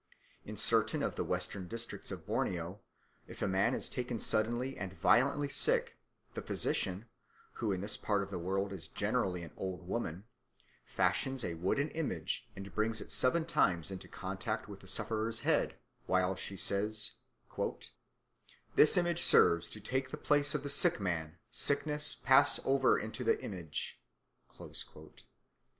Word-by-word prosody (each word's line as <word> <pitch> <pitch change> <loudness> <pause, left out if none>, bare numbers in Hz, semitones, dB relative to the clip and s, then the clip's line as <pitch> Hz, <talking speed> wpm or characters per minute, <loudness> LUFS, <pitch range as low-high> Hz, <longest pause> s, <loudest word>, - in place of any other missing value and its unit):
In - - -7
certain - - +4
of - - -2
the - - -1
western 95 -3 -3
districts 115 +4 -4
of - - -5
Borneo 90 +3 -2 0.5
if - - -11
a - - +1
man 95 +6 +2
is - - -3
taken 125 -2 -4
suddenly 120 +5 0
and 95 -2 -6
violently 140 - +3
sick, 140 - +2 0.4
the - - -5
physician, 95 +4 0 0.6
who 110 -3 0
in 95 -1 -2
this 105 +2 0
part 105 -2 0
of 100 - -9
the 90 - -3
world 95 +3 -2
is 80 -4 -7
generally 90 +1 -1
an 80 - -10
old 90 -2 -5
woman, 95 -4 -3 0.6
fashions 135 -3 0
a 85 - -3
wooden 95 - 0
image 120 - -3
and 100 0 -9
brings 110 +1 +1
it - - -7
seven 160 +6 +2
times 90 - +1
into 95 - -7
contact - - -4
with - - -9
the - - -15
sufferer's 110 0 -1
head, - - +1 0.3
while 95 0 +2
she 95 +1 -7
says: 105 +3 +1 1.6
"This 155 - +8
image 175 -1 +1
serves 85 - +4
to 110 - -6
take 130 +5 -2
the 150 - -6
place 145 0 +3
of - - -2
the 140 - -3
sick 140 +3 +4
man; 85 -4 -3
sickness, 150 +4 +2
pass 130 +1 +6
over 135 -1 +3
into 110 +4 -4
the 115 - +2
image." 90 -7 -5
105 Hz, 155 wpm, -33 LUFS, 95-130 Hz, 1.6 s, This